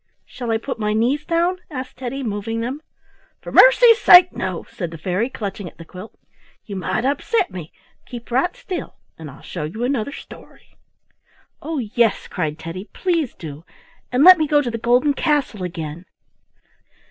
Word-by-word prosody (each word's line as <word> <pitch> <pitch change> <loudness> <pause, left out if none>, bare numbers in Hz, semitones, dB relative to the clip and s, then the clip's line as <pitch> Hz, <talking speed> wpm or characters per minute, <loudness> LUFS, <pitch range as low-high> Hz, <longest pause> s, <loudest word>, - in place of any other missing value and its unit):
"Shall 245 -3 -7
I 225 - +2
put 240 +1 -6
my 210 -1 0
knees 255 +8 0
down?" 345 +2 +1
asked 260 -4 -7
Teddy, 265 +2 -5
moving 220 0 -3
them. 260 +6 -4 0.6
"For - - -9
mercy's 485 -2 +7
sake! 360 -4 +8
no," - - -3
said 175 -4 -5
the 165 - -9
fairy, 185 +9 -1
clutching 200 -6 -6
at - - -24
the 165 - -11
quilt. 185 +6 -11 0.5
"You 200 - -7
might 195 +5 -2
upset 360 - 0
me. 170 -4 -8 0.4
Keep 240 -1 -9
right 270 +9 +1
still 365 -3 -6 0.2
and 160 -2 -8
I'll 140 - -14
show 170 - -6
you 185 +10 -5
another 255 -1 -1
story." - - -14 0.9
"Oh, 320 0 -4
yes!" 230 -3 0
cried 155 -4 -3
Teddy; 185 +6 -8
"please 335 -8 -1
do; 155 -2 -9 0.5
and 250 +3 +3
let 365 0 +9
me 310 - +1
go 295 0 +4
to 240 - -3
the 230 - -4
golden 245 +5 +3
castle 290 - 0
again." 165 -1 -6
235 Hz, 170 wpm, -21 LUFS, 185-290 Hz, 0.9 s, let